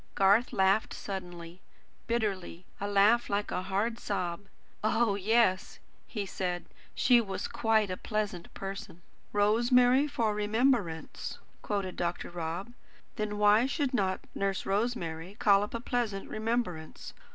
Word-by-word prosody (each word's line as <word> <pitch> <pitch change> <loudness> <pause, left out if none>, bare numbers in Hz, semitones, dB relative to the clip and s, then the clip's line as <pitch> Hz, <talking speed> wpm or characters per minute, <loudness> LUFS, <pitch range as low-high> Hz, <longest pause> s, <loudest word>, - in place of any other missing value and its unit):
Garth 200 +5 +4
laughed 195 +3 +2
suddenly, 175 -2 -7 0.5
bitterly; 195 -6 -2
a 200 - -2
laugh 205 +4 +4
like 205 +1 -1
a - - -1
hard, 200 +5 -1
sob. 185 -1 -3 0.4
"Oh, 225 0 +2
yes," 200 -1 +2 0.3
he 210 -4 -3
said, 180 -2 -3 0.3
"she 245 -2 +5
was 195 -4 -4
quite 220 -3 +1
a 185 - -3
pleasant 210 -5 -3
person." 195 -3 -7 0.3
"'Rosemary 245 +6 +4
for 230 -7 0
remembrance,'" 210 -5 0 0.2
quoted 195 -3 -3
Dr. 175 0 -2
Rob. 175 +6 -4 0.4
"Then 210 -1 -2
why 210 +4 +5
should 280 -1 -1
not 190 -5 0
Nurse 195 -1 -1
Rosemary 195 -5 -2
call 200 -2 +5
up 210 +3 -4
a - - -2
pleasant 230 -5 -2
remembrance? 215 -8 -3
205 Hz, 130 wpm, -30 LUFS, 185-230 Hz, 0.5 s, she